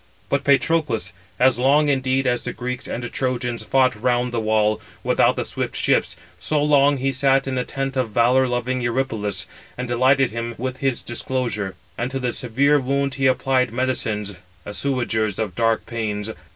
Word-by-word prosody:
But 140 0 0
Patroclus, 140 -3 +1 0.3
as 125 -1 +4
long 145 +4 +4
indeed 135 -1 +1
as 120 -1 +1
the 125 - -4
Greeks 125 0 -5
and 120 0 -5
Trojans 125 -2 -2
fought 130 -1 +2
round 125 +2 0
the 120 - -1
wall, 110 -1 +1 0.2
without - - +3
the - - -2
swift - - -4
ships, 85 - +1 0.2
so 150 +8 0
long 145 -1 +4
he 135 +1 0
sat 135 +1 +2
in 135 - -2
the 125 -1 0
tent 135 0 -4
of 130 -3 0
valour 125 +4 +3
loving 125 +1 -1
Eurypylus, 110 -6 -1 0.3
and 125 0 -3
delighted 130 +2 +3
him 115 +1 -4
with 130 +2 -4
his 135 -3 -1
discourse; 120 -1 -3 0.4
and 120 +1 -1
to 135 - -3
the 125 -2 -2
severe 140 +5 +2
wound 140 +1 -1
he 135 -1 +1
applied 130 -1 +2
medicines, 110 -5 -2 0.3
assuagers 110 -3 -1
of 110 -5 -2
dark 115 +2 +1
pains. 110 -2 -3
125 Hz, 170 wpm, -22 LUFS, 115-135 Hz, 0.4 s, as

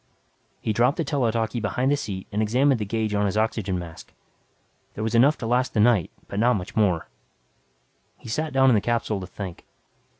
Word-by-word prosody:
He 110 - -1
dropped 120 +5 +2
the 165 - 0
tele 135 -5 0
talkie 115 +1 -1
behind 125 +5 0
the - - +4
seat 100 -9 -5
and 105 +1 -1
examined 125 +4 +2
the 105 - -2
gauge 110 0 -2
on 105 0 +1
his 100 - -2
oxygen 105 -4 0
tank. 85 -2 -10 0.8
There 110 - -4
was 110 0 -2
enough 135 +6 +5
to 115 - -6
last 125 +2 0
the - - +2
night 105 -6 +4 0.2
but 100 - -4
not 120 +2 +4
much 100 +3 -6
more. 95 -7 +1 1.1
He - - -14
sat 155 +7 -2
down 135 -1 +4
in - - +5
the 105 - +3
capsule 115 -2 -1
to 90 - -7
think. 95 -2 -8
110 Hz, 205 wpm, -24 LUFS, 100-125 Hz, 1.1 s, enough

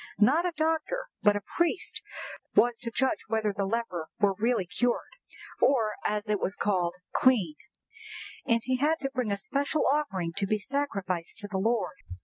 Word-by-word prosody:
Not 290 - +4
a 350 - -2
doctor, 325 +11 0
but 205 -1 +5
a 205 - -2
priest, 345 +2 0 0.5
was 240 -1 +4
to 235 - -4
judge 260 +3 +1
whether 220 -2 0
the 200 -1 -1
leper 195 -7 -2
were 205 -2 +4
really 225 0 +1
cured, 245 +7 0 0.5
or, 230 -6 +4
as 210 +1 -1
it 210 -1 +1
was 190 - -1
called, 180 -4 0 0.2
clean; 220 -12 +4 0.9
and 230 0 +2
he 255 0 +1
had 305 +5 +2
to 270 -1 -2
bring 250 -5 -1
a 200 - 0
special 280 +8 0
offering 230 - 0
to 195 - +1
be 215 - +2
sacrificed 195 -9 -2
to 205 - -5
the 195 -2 -2
Lord." 225 +2 0
225 Hz, 170 wpm, -29 LUFS, 200-270 Hz, 0.9 s, but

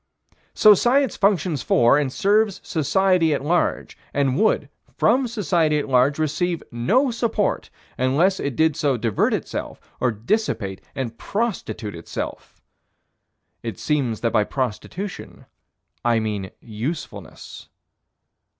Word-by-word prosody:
So 215 - +8
Science 250 +3 +2
functions 185 -7 +1
for 120 +2 +4
and 145 -3 +1
serves 205 +3 +2
society 170 0 +2
at 140 - -5
large, 175 +3 0 0.2
and 135 -2 +1
would, 220 +8 +2 0.3
from 260 0 +3
society 170 -9 +1
at 145 - -2
large, 130 +2 +3
receive 160 +3 -1
no 220 - +2
support, 225 -3 -1 0.3
unless 150 +10 +2
it 140 -3 -3
did 160 -2 +2
so 145 -5 +1
divert 115 -3 +1
itself - - -4 0.2
or 125 - +2
dissipate 110 - -2
and 120 -4 -4
prostitute 200 - -3
itself. 85 -1 -7 1.0
It 115 -2 -5
seems 135 -8 -1
that 115 -2 0
by 105 - +4
prostitution 135 - -5 0.6
I 120 -1 +3
mean 105 -3 -3
usefulness. 120 +9 -7
150 Hz, 120 wpm, -22 LUFS, 120-195 Hz, 1.0 s, So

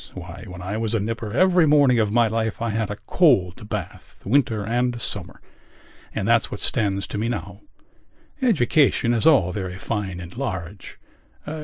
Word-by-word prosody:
Why, - - -9
when 90 -1 -9
I 100 +4 -3
was 115 0 -1
a - - +2
nipper 115 +1 -4
every 180 - +4
morning 140 -5 +4
of 105 -2 +1
my 120 +1 +3
life 110 +1 -2
I 115 -1 -1
had 110 -1 -2
a 105 - -3
cold 105 - +2
bath, 100 -5 -6
winter 110 -3 +1
and 120 +1 0
summer. - - 0 0.8
And 100 - -2
that's 115 -1 +3
what 100 - -6
stands 100 -4 0
to 105 - -5
me 115 +2 -1
now. 120 -4 -5 0.8
Education 145 - +3
is 115 +3 +2
all 130 - +4
very 95 -2 -5
fine 95 -3 -4
and 85 0 -10
large.... 100 -7 -6
110 Hz, 170 wpm, -23 LUFS, 100-120 Hz, 0.8 s, every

